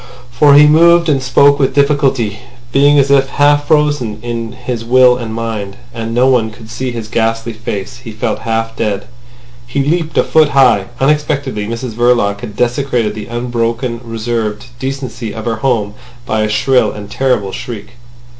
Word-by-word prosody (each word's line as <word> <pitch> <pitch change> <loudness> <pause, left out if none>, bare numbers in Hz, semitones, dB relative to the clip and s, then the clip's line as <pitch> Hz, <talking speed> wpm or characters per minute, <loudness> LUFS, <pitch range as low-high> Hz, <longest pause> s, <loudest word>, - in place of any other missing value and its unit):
For 140 +3 +5
he 150 +1 +8
moved 170 +2 +5
and 140 -3 +1
spoke 140 +3 +3
with 135 -1 +1
difficulty, 135 -7 +1 0.3
being 145 +2 +4
as 140 0 +3
if 135 -1 +3
half 145 0 +2
frozen 145 -8 +1
in 115 -1 -4
his 125 -2 -5
will 125 +1 +5
and 120 -3 -6
mind—and 115 +1 -6
no 120 +2 +2
one 125 -4 +2
could 110 0 -13
see 130 +1 -3
his 115 -3 -6
ghastly 115 +1 -1
face. 110 -1 -6
He 120 -2 -10
felt 110 - -3
half 115 0 -2
dead. 100 -3 -2 0.6
He 135 +3 -1
leaped 160 +2 -1
a - - +5
foot 155 -2 +3
high. 130 -8 +4
Unexpectedly 140 -6 0
Mrs 115 +1 -5
Verloc 120 -3 +1
had 105 -4 -8
desecrated 120 -2 0
the 105 -1 -7
unbroken 120 0 -2
reserved 115 -2 -3
decency 130 -5 -5
of 110 - -6
her 115 -2 -1
home 110 -4 -1 0.3
by 110 -3 -1
a 110 - 0
shrill 110 +1 +2
and 105 -1 -9
terrible 120 -3 -1
shriek. 120 -4 -7
120 Hz, 165 wpm, -14 LUFS, 110-135 Hz, 0.6 s, he